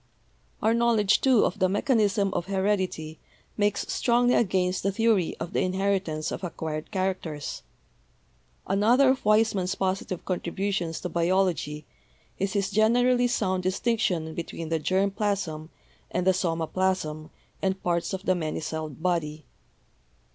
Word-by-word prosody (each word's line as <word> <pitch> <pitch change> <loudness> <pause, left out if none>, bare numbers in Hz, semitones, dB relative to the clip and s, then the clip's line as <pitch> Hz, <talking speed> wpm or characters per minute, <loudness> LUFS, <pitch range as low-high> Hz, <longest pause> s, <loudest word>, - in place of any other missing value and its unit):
"Our 220 - +4
knowledge, 225 -3 +3
too, 260 -5 +4
of - - -2
the 185 -1 +3
mechanism 205 -2 +1
of 175 - -2
heredity 190 -5 -1 0.4
makes 205 -1 +1
strongly 245 0 +3
against 185 -3 +1
the 195 - 0
theory 215 -4 +1
of 165 - -5
the - - +1
inheritance 185 -4 -1
of - - -5
acquired 160 -3 -4
characters. 185 -7 -3 1.0
Another 230 +8 +4
of 265 +1 +1
Weismann's 210 -3 +2
positive 190 -2 -2
contributions 180 -1 -2
to 180 - -3
biology 170 -3 0 0.5
is 195 0 -1
his 200 -2 0
generally 245 +3 +3
sound 190 -6 0
distinction 185 -4 0
between 165 0 -6
the 165 -1 0
germ 190 +5 +1
plasm 195 -7 -2 0.4
and 180 - -1
the 190 - +5
soma 165 -3 -1
plasm 160 -4 -1 0.3
and 190 0 -1
parts 170 -1 0
of 190 -1 -4
the 185 - +3
many 160 -4 -3
celled 160 -1 -5
body. 155 -4 -1
190 Hz, 135 wpm, -26 LUFS, 170-205 Hz, 1.0 s, the